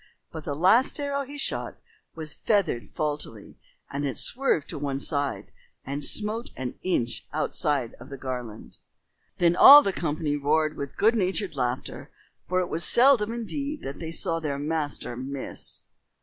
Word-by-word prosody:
But 160 -2 -8
the 145 - -3
last 220 - +4
arrow 280 -1 -1
he 285 +2 -9
shot 275 - -2 0.4
was 155 -2 -5
feathered 195 - 0
faultily, 145 -8 -4 0.3
and 140 +1 -3
it 140 -2 -2
swerved 250 - +1
to - - -5
one 140 -1 -2
side, 145 -1 -1 0.3
and 140 +2 -4
smote 220 - -1
an 130 -1 -4
inch 120 -10 -1
outside 145 -4 0
of 125 +4 -12
the 140 - -7
garland. 125 -4 -7 0.6
Then 175 -1 +3
all 290 +9 +11
the 195 - 0
company 155 -3 -1
roared 155 +2 +1
with 140 -1 -6
good 220 +3 +4
natured 190 -4 0
laughter, 125 -1 -3 0.4
for 185 +1 +2
it 180 - -2
was 165 0 0
seldom 240 -4 +4
indeed 280 +6 -4
that 135 +1 -6
they 165 -1 -5
saw 165 0 -1
their 150 -3 -3
master 145 -4 -3
miss. 130 +2 -6
155 Hz, 160 wpm, -26 LUFS, 140-210 Hz, 0.6 s, all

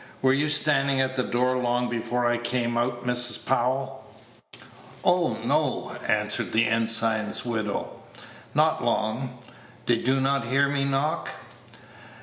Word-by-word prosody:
"Were 130 0 +5
you 145 +2 +1
standing 140 -2 +2
at 130 0 0
the 130 - +1
door 125 +1 0
long 125 0 0
before 120 +1 -2
I 120 0 +1
came 120 0 -1
out, 120 +1 -1
Mrs. 125 0 +1
Powell?" 130 +1 -1 1.0
"Oh, - - +2
no," - - 0
answered 105 0 0
the 115 +1 +4
ensign's 115 -1 0
widow, 110 -4 -3 0.5
"not - - +2
long. 120 +4 -1 0.5
Did 120 0 +1
you 135 +1 +3
not 135 -3 0
hear 140 +3 +3
me 140 -1 0
knock?" 140 +3 -1
125 Hz, 135 wpm, -25 LUFS, 115-135 Hz, 1.0 s, Were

